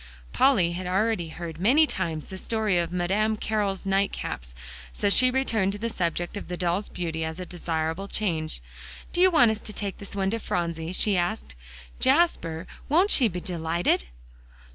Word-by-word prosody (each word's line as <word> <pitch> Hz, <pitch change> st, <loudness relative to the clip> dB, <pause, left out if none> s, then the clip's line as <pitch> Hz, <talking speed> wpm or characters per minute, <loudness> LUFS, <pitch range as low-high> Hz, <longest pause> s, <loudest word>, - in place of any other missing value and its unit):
Polly 195 Hz, -11 st, +4 dB
had 180 Hz, +1 st, -4 dB
already 190 Hz, -1 st, +1 dB
heard 165 Hz, 0 st, -7 dB
many 265 Hz, -, +5 dB
times 165 Hz, -, -3 dB
the 190 Hz, -1 st, -7 dB
story 215 Hz, -5 st, +1 dB
of 170 Hz, -1 st, -1 dB
Madame 200 Hz, +5 st, +1 dB
Carroll's 205 Hz, -3 st, -1 dB
night 195 Hz, +1 st, +2 dB
caps, -, -, -6 dB, 0.4 s
so 205 Hz, -, 0 dB
she 255 Hz, +4 st, +5 dB
returned 225 Hz, -7 st, +1 dB
to -, -, -5 dB
the 230 Hz, +2 st, -3 dB
subject 175 Hz, -1 st, -2 dB
of 205 Hz, -, -6 dB
the 180 Hz, -, -4 dB
doll's 180 Hz, +3 st, -1 dB
beauty 165 Hz, -2 st, -3 dB
as 160 Hz, +2 st, -4 dB
a 180 Hz, -, -4 dB
desirable 165 Hz, +1 st, -3 dB
change. 160 Hz, -, -2 dB, 0.5 s
"Do 350 Hz, -, +1 dB
you 375 Hz, -, +7 dB
want 245 Hz, -10 st, +5 dB
us 220 Hz, -, -3 dB
to 215 Hz, -, -7 dB
take 200 Hz, -1 st, -4 dB
this 200 Hz, -, -9 dB
to 200 Hz, +3 st, 0 dB
Phronsie?" 170 Hz, -4 st, -2 dB
she 200 Hz, +1 st, +2 dB
asked. 175 Hz, -, -2 dB, 0.5 s
"Jasper, 260 Hz, -, +2 dB, 0.2 s
won't 355 Hz, +8 st, +4 dB
she 250 Hz, -, +6 dB
be 180 Hz, -3 st, -4 dB
delighted?" 170 Hz, -, 0 dB
190 Hz, 175 wpm, -26 LUFS, 170-215 Hz, 0.5 s, you